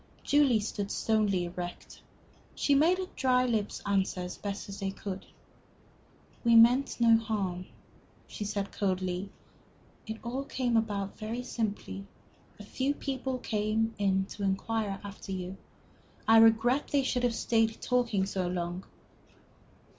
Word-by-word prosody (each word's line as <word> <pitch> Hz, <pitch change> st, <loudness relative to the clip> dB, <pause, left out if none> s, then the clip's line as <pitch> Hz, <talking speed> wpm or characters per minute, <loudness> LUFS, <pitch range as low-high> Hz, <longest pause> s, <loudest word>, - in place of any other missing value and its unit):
Julie 285 Hz, -6 st, +4 dB
stood 205 Hz, -1 st, -3 dB
stonily 205 Hz, -6 st, +1 dB
erect. 175 Hz, 0 st, -7 dB, 0.5 s
She 285 Hz, -, +2 dB
made 320 Hz, +6 st, +4 dB
her 375 Hz, -, -2 dB
dry 255 Hz, -1 st, +3 dB
lips 220 Hz, -4 st, -1 dB
answer 195 Hz, -2 st, 0 dB
as 180 Hz, 0 st, -5 dB
best 200 Hz, 0 st, -6 dB
they 195 Hz, -1 st, -1 dB
could. 195 Hz, 0 st, -6 dB, 1.2 s
"We 235 Hz, -1 st, +5 dB
meant 245 Hz, +5 st, +5 dB
no 230 Hz, -1 st, +6 dB
harm," 195 Hz, -5 st, -3 dB, 0.6 s
she -, -, -6 dB
said, 200 Hz, -1 st, -3 dB
coldly. 185 Hz, -1 st, -1 dB, 0.8 s
"It 220 Hz, 0 st, -4 dB
all 255 Hz, +3 st, -3 dB
came 250 Hz, -4 st, -1 dB
about 205 Hz, -3 st, -1 dB
very 225 Hz, +3 st, -4 dB
simply. 205 Hz, -4 st, -4 dB, 0.5 s
A -, -, -8 dB
few 265 Hz, +7 st, -1 dB
people 265 Hz, -2 st, -3 dB
came 220 Hz, -1 st, 0 dB
in 190 Hz, -1 st, +2 dB
to 205 Hz, -, -9 dB
inquire 200 Hz, +1 st, -1 dB
after 200 Hz, -1 st, -8 dB
you. 185 Hz, 0 st, -4 dB, 0.7 s
I 225 Hz, 0 st, +7 dB
regret 225 Hz, +5 st, +4 dB
they 280 Hz, -1 st, +2 dB
should 250 Hz, -1 st, 0 dB
have 245 Hz, -2 st, +1 dB
stayed 225 Hz, -1 st, +1 dB
talking 235 Hz, -6 st, +1 dB
so 190 Hz, -2 st, -2 dB
long." 175 Hz, +1 st, -3 dB
215 Hz, 135 wpm, -30 LUFS, 195-240 Hz, 1.2 s, I